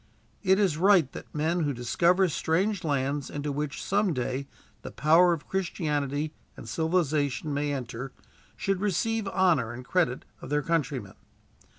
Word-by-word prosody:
It 190 Hz, -1 st, +4 dB
is 190 Hz, -7 st, +2 dB
right 180 Hz, -7 st, +5 dB
that -, -, -9 dB
men 160 Hz, +4 st, 0 dB
who 145 Hz, -4 st, 0 dB
discover 170 Hz, +10 st, +2 dB
strange 180 Hz, +6 st, 0 dB
lands 140 Hz, -2 st, -1 dB
into 145 Hz, 0 st, -3 dB
which, 145 Hz, 0 st, -3 dB
some 200 Hz, -4 st, +1 dB
day, 130 Hz, +2 st, -2 dB, 0.3 s
the -, -, -7 dB
power 165 Hz, +4 st, +4 dB
of 165 Hz, -3 st, -3 dB
Christianity 150 Hz, -5 st, -1 dB, 0.2 s
and -, -, -9 dB
civilization 155 Hz, -5 st, 0 dB
may 145 Hz, +1 st, -1 dB
enter, 130 Hz, -1 st, -5 dB, 0.4 s
should 195 Hz, -1 st, -1 dB
receive 210 Hz, +2 st, 0 dB
honor 175 Hz, -12 st, +2 dB
and 125 Hz, +1 st, -8 dB
credit 160 Hz, -6 st, 0 dB, 0.2 s
of -, -, -8 dB
their 150 Hz, 0 st, +1 dB
countrymen. 140 Hz, -, -1 dB
155 Hz, 150 wpm, -28 LUFS, 140-180 Hz, 0.4 s, right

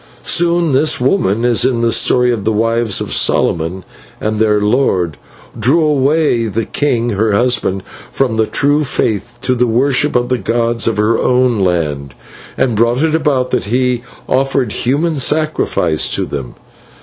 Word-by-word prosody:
"Soon 170 Hz, -1 st, +2 dB
this 150 Hz, +4 st, +1 dB
woman, 125 Hz, -, +1 dB
as 120 Hz, -2 st, +2 dB
in 120 Hz, -3 st, +1 dB
the 115 Hz, 0 st, +1 dB
story 125 Hz, +1 st, +2 dB
of 115 Hz, -4 st, -3 dB
the 110 Hz, -, 0 dB
wives 115 Hz, 0 st, 0 dB
of -, -, -4 dB
Solomon 85 Hz, +3 st, 0 dB, 0.4 s
and 110 Hz, 0 st, -2 dB
their 105 Hz, -1 st, +2 dB
lord, 105 Hz, -, 0 dB, 0.4 s
drew 160 Hz, +7 st, +2 dB
away 145 Hz, -4 st, +1 dB
the 110 Hz, +1 st, -2 dB
king, 120 Hz, -5 st, -1 dB
her 105 Hz, +1 st, 0 dB
husband, 100 Hz, -4 st, 0 dB, 0.3 s
from 130 Hz, -4 st, -1 dB
the 110 Hz, -1 st, +1 dB
true 145 Hz, +2 st, +1 dB
faith 120 Hz, -4 st, -2 dB
to 130 Hz, -, +1 dB
the 125 Hz, 0 st, +1 dB
worship 130 Hz, +4 st, +1 dB
of 120 Hz, 0 st, +1 dB
the 125 Hz, -1 st, 0 dB
gods 115 Hz, +3 st, -1 dB
of 115 Hz, -, 0 dB
her 110 Hz, +2 st, +1 dB
own 125 Hz, -3 st, +2 dB
land, 75 Hz, -7 st, -1 dB, 0.4 s
and 130 Hz, -3 st, +1 dB
brought 120 Hz, +5 st, +1 dB
it 160 Hz, -1 st, +1 dB
about 140 Hz, -5 st, 0 dB
that -, -, -1 dB
he 125 Hz, +2 st, 0 dB, 0.3 s
offered 135 Hz, -3 st, 0 dB
human 150 Hz, +8 st, -1 dB
sacrifice 145 Hz, -, 0 dB
to -, -, -2 dB
them. 70 Hz, -4 st, -6 dB
120 Hz, 160 wpm, -14 LUFS, 105-135 Hz, 0.4 s, Soon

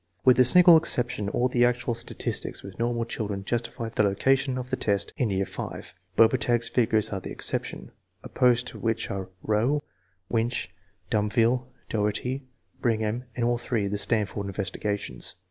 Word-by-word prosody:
With 130 Hz, 0 st, +6 dB
a 125 Hz, -, +7 dB
single 175 Hz, +5 st, +9 dB
exception, 125 Hz, -8 st, -1 dB
all 125 Hz, +4 st, +1 dB
the 125 Hz, -1 st, +2 dB
actual 120 Hz, 0 st, +1 dB
statistics 115 Hz, -, -4 dB
with 95 Hz, 0 st, -10 dB
normal 120 Hz, 0 st, 0 dB
children 100 Hz, -4 st, -4 dB
justify 115 Hz, 0 st, -2 dB
the 110 Hz, -, 0 dB
location 130 Hz, +6 st, +2 dB
of 125 Hz, 0 st, -6 dB
the -, -, +2 dB
test 100 Hz, -1 st, -1 dB
in 125 Hz, -, 0 dB
year 95 Hz, 0 st, 0 dB
V. -, -, -7 dB, 0.3 s
Bobertag's 115 Hz, 0 st, +3 dB
figures 110 Hz, -3 st, +1 dB
are 95 Hz, -, -2 dB
the -, -, -8 dB
exception, -, -, -3 dB, 0.3 s
opposed 125 Hz, -1 st, +2 dB
to -, -, -10 dB
which 115 Hz, -1 st, -1 dB
are 95 Hz, -1 st, -4 dB
Rowe, 120 Hz, +8 st, +1 dB, 0.4 s
Winch, 115 Hz, +2 st, -1 dB, 0.4 s
Dumville, 115 Hz, +4 st, +2 dB, 0.2 s
Dougherty, 120 Hz, +5 st, -2 dB, 0.3 s
Brigham, 110 Hz, +1 st, 0 dB
and 120 Hz, -, 0 dB
all 120 Hz, 0 st, +1 dB
three 115 Hz, -4 st, -1 dB
of 100 Hz, -, -3 dB
the 105 Hz, -, -1 dB
Stan 110 Hz, -1 st, +1 dB
ford 100 Hz, +1 st, -5 dB
investigations. 100 Hz, -, -3 dB
115 Hz, 165 wpm, -26 LUFS, 105-125 Hz, 0.4 s, single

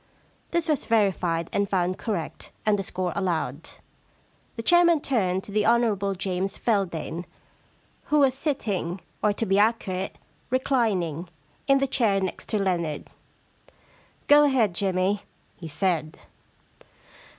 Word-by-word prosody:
This 340 Hz, -1 st, 0 dB
was 305 Hz, -4 st, 0 dB
verified 185 Hz, -7 st, +1 dB
and 200 Hz, -1 st, +1 dB
found 185 Hz, -1 st, 0 dB
correct 200 Hz, -8 st, -4 dB, 0.2 s
and 210 Hz, -1 st, +3 dB
the -, -, +1 dB
score 180 Hz, -2 st, -3 dB
allowed. 165 Hz, -6 st, -2 dB, 0.9 s
The 230 Hz, -, -5 dB
chairman 345 Hz, +2 st, +5 dB
turned 190 Hz, -9 st, 0 dB
to -, -, -10 dB
the 210 Hz, +1 st, +1 dB
Hon. 215 Hz, -4 st, +2 dB
James 190 Hz, +1 st, -2 dB
Feldane, 175 Hz, -6 st, -1 dB, 0.8 s
who 300 Hz, -, +2 dB
was 275 Hz, -3 st, +4 dB
sitting 215 Hz, -, -2 dB
— -, -, -36 dB
or, 210 Hz, -, +4 dB
to 225 Hz, -, -2 dB
be 195 Hz, 0 st, +2 dB
accurate, 205 Hz, -4 st, 0 dB, 0.3 s
reclining 200 Hz, -, 0 dB, 0.2 s
— -, -, -36 dB
in 275 Hz, -, +5 dB
the 275 Hz, -, +2 dB
chair 230 Hz, -7 st, +2 dB
next 190 Hz, -1 st, -4 dB
to 215 Hz, -, +1 dB
Leonard. 170 Hz, -6 st, -1 dB, 0.6 s
* -, -, -33 dB
Go 295 Hz, 0 st, +7 dB
ahead, 245 Hz, -9 st, +2 dB
Jimmy,' 190 Hz, +2 st, +1 dB, 0.4 s
he 170 Hz, -, -8 dB
said. 160 Hz, -1 st, -1 dB
195 Hz, 140 wpm, -25 LUFS, 180-235 Hz, 0.9 s, Go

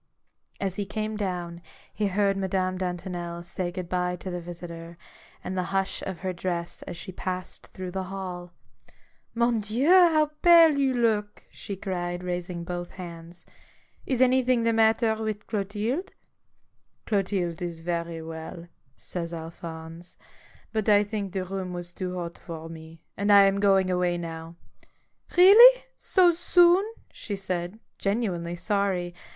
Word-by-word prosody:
As 195 Hz, -2 st, -2 dB
he 205 Hz, -, -2 dB
came 215 Hz, +1 st, -3 dB
down, 175 Hz, -4 st, -4 dB, 0.3 s
he 210 Hz, 0 st, 0 dB
heard 200 Hz, 0 st, +1 dB
Madame 190 Hz, -1 st, -1 dB
Dantonel 175 Hz, -1 st, -4 dB
say 175 Hz, 0 st, -4 dB
good 180 Hz, -1 st, -5 dB
bye 180 Hz, 0 st, -1 dB
to 185 Hz, +1 st, -7 dB
the 175 Hz, 0 st, -4 dB
visitor, 170 Hz, -1 st, -9 dB, 0.5 s
and 185 Hz, -, -4 dB
the 185 Hz, -1 st, -1 dB
hush 195 Hz, 0 st, -1 dB
of 190 Hz, -3 st, -6 dB
her 185 Hz, -1 st, -2 dB
dress 175 Hz, -1 st, -4 dB
as -, -, -6 dB
she 185 Hz, -, -7 dB
passed 185 Hz, 0 st, -5 dB
through 185 Hz, -1 st, -7 dB
the 190 Hz, 0 st, -3 dB
hall. 185 Hz, -2 st, -6 dB, 0.4 s
" -, -, -36 dB
Mon 235 Hz, 0 st, +2 dB
Dieu! 220 Hz, +7 st, -1 dB
how 330 Hz, -5 st, +6 dB
pale 335 Hz, -3 st, +7 dB
you 265 Hz, -2 st, +2 dB
look!" 215 Hz, -3 st, 0 dB
she 200 Hz, -, -7 dB
cried, 180 Hz, -2 st, -4 dB
raising 175 Hz, -1 st, -4 dB
both 175 Hz, 0 st, -5 dB
hands. 170 Hz, -1 st, -10 dB
u -, -, -25 dB, 0.6 s
Is 255 Hz, 0 st, +4 dB
anything 255 Hz, -1 st, +3 dB
the 230 Hz, 0 st, +2 dB
matter 225 Hz, 0 st, +3 dB
with 215 Hz, -1 st, -3 dB
Clotilde? 215 Hz, -, -2 dB, 0.3 s
" -, -, -46 dB
" -, -, -46 dB
Clotilde 190 Hz, -5 st, -1 dB
is 170 Hz, -2 st, -5 dB
very 170 Hz, -1 st, -3 dB
well," 160 Hz, +1 st, -8 dB, 0.3 s
says 170 Hz, -2 st, -5 dB
Alphonse. 165 Hz, +1 st, -9 dB, 0.3 s
" -, -, -27 dB
But 220 Hz, -1 st, 0 dB
I 205 Hz, 0 st, +6 dB
think 205 Hz, -2 st, -4 dB
the 190 Hz, -1 st, -3 dB
room 185 Hz, -1 st, -4 dB
was 175 Hz, 0 st, -7 dB
too 185 Hz, -1 st, -4 dB
hot 170 Hz, -1 st, -6 dB
for 165 Hz, -2 st, -8 dB
me, 160 Hz, 0 st, -11 dB
and 205 Hz, +2 st, +1 dB
I 200 Hz, -1 st, +9 dB
am 195 Hz, 0 st, +3 dB
going 195 Hz, -2 st, +3 dB
away 180 Hz, -1 st, +1 dB
now." 165 Hz, -1 st, -7 dB, 0.4 s
" -, -, -20 dB
Really! 465 Hz, +8 st, +9 dB
so 365 Hz, -3 st, +4 dB
soon? 350 Hz, +2 st, +4 dB, 0.2 s
" -, -, -36 dB
she 205 Hz, -, -5 dB
said, 185 Hz, +1 st, -4 dB, 0.2 s
genuinely 190 Hz, -5 st, -1 dB
sorry. 185 Hz, -2 st, -1 dB
185 Hz, 160 wpm, -26 LUFS, 175-210 Hz, 0.6 s, I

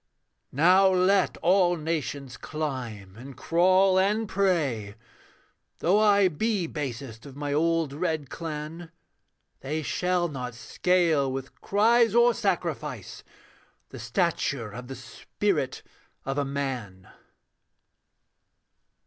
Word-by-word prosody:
'Now 180 Hz, +7 st, +5 dB
let 190 Hz, +1 st, +2 dB
all 175 Hz, 0 st, +4 dB
nations 145 Hz, -5 st, -4 dB
climb 125 Hz, -11 st, -5 dB
and 130 Hz, +2 st, -11 dB
crawl 185 Hz, +5 st, +3 dB
and 210 Hz, +3 st, +1 dB
pray; 150 Hz, -, 0 dB, 0.8 s
Though 190 Hz, +5 st, +2 dB
I 205 Hz, -2 st, +5 dB
be 195 Hz, +3 st, -1 dB
basest 135 Hz, -5 st, -6 dB
of 135 Hz, -, -12 dB
my 145 Hz, 0 st, -3 dB
old 165 Hz, -1 st, +1 dB
red 160 Hz, -2 st, -2 dB
clan, 160 Hz, +2 st, -6 dB, 0.7 s
They 155 Hz, +3 st, -3 dB
shall 180 Hz, +2 st, 0 dB
not 125 Hz, -6 st, -6 dB
scale, 160 Hz, +2 st, +1 dB
with 135 Hz, 0 st, -7 dB
cries 225 Hz, +2 st, +3 dB
or 235 Hz, 0 st, +5 dB
sacrifice, -, -, -3 dB, 0.7 s
The -, -, -10 dB
stature 145 Hz, -, -1 dB
of 125 Hz, +3 st, -8 dB
the 135 Hz, -, -7 dB
spirit 135 Hz, -, -3 dB, 0.4 s
of 135 Hz, +1 st, -2 dB
a 140 Hz, -, 0 dB
man.' 130 Hz, -9 st, -4 dB
155 Hz, 105 wpm, -26 LUFS, 135-185 Hz, 0.8 s, Now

